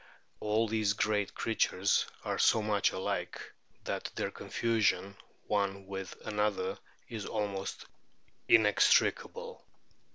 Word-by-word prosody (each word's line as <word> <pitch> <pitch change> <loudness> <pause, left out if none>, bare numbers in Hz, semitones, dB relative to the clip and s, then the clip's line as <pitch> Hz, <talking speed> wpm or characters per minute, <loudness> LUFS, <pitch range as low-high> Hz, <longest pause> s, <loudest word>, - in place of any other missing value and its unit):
All 110 +2 +1
these 110 -2 +1
great 105 -1 0
creatures 100 -3 +1 0.2
are - - -1
so 110 - +4
much 105 -1 +2
alike 95 - -3 0.4
that - - -3
their - - -1
o - - -14
confusion 100 -4 0 0.3
one 100 -1 -1
with 95 -1 -6
another 105 -3 -1 0.3
is 110 -3 -5
almost 100 -2 -3 0.6
inextricable. 470 - +3
105 Hz, 105 wpm, -32 LUFS, 100-110 Hz, 0.6 s, so